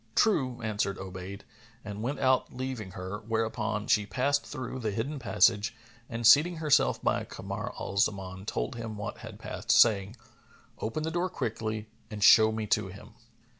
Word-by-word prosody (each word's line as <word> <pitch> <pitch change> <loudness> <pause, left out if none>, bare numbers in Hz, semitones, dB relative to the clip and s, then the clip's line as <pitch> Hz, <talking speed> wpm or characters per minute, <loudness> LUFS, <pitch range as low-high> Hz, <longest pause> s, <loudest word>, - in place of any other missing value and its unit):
"True," 130 - +2
answered 105 -3 -1
Obayd, 95 +1 -7 0.4
and 105 0 -6
went 130 +6 -2
out 130 -1 +2
leaving 130 -7 -4
her, 95 +2 -5
whereupon 110 -1 -2
she 105 -1 +2
passed 140 +8 0
through 130 -2 -5
the 110 -3 -1
hidden 120 +8 -3
passage 110 0 +2 0.3
and 115 0 -4
seating 155 +9 +7
herself 155 -3 +3
by - - +1
Kamar - - -6
al 100 - -5
Zaman, 95 -2 -1
told 130 - -2
him 110 -2 -6
what 105 - -5
had - - -9
passed, - - -8
saying, 105 -2 +5 0.6
"Open 115 +8 -3
the 160 - -2
door 175 +2 0
quickly 110 -5 -3 0.2
and 105 -2 -4
show 110 +1 +8
me 110 0 -3
to 105 -1 +1
him." 100 +4 -12
110 Hz, 165 wpm, -29 LUFS, 100-130 Hz, 0.6 s, show